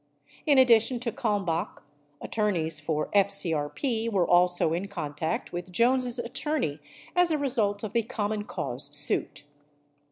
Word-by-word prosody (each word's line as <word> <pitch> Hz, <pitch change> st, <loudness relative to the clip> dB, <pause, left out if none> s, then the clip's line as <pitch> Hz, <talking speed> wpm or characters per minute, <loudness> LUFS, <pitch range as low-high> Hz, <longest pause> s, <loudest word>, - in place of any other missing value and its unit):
In 285 Hz, -2 st, +5 dB
addition 240 Hz, -1 st, +5 dB
to 240 Hz, -2 st, -2 dB
Kalmbach, 205 Hz, -9 st, -2 dB, 0.4 s
attor 210 Hz, -1 st, 0 dB
neys 160 Hz, -4 st, -2 dB
for 150 Hz, 0 st, -2 dB
FCRP 200 Hz, -, +1 dB
were 185 Hz, -4 st, +2 dB
also 175 Hz, -2 st, +3 dB
in 180 Hz, +4 st, -2 dB
contact 160 Hz, -5 st, -4 dB
with 175 Hz, +1 st, -5 dB
Jones' 245 Hz, +4 st, +2 dB
attorney 240 Hz, -, -2 dB, 0.4 s
as 355 Hz, -1 st, +4 dB
a 315 Hz, -, +2 dB
result 230 Hz, -8 st, +1 dB
of 215 Hz, -1 st, -5 dB
the 235 Hz, -, +3 dB
Common 210 Hz, -2 st, -3 dB
Cause 125 Hz, -7 st, -4 dB
suit. 145 Hz, 0 st, 0 dB
205 Hz, 135 wpm, -27 LUFS, 170-240 Hz, 0.4 s, In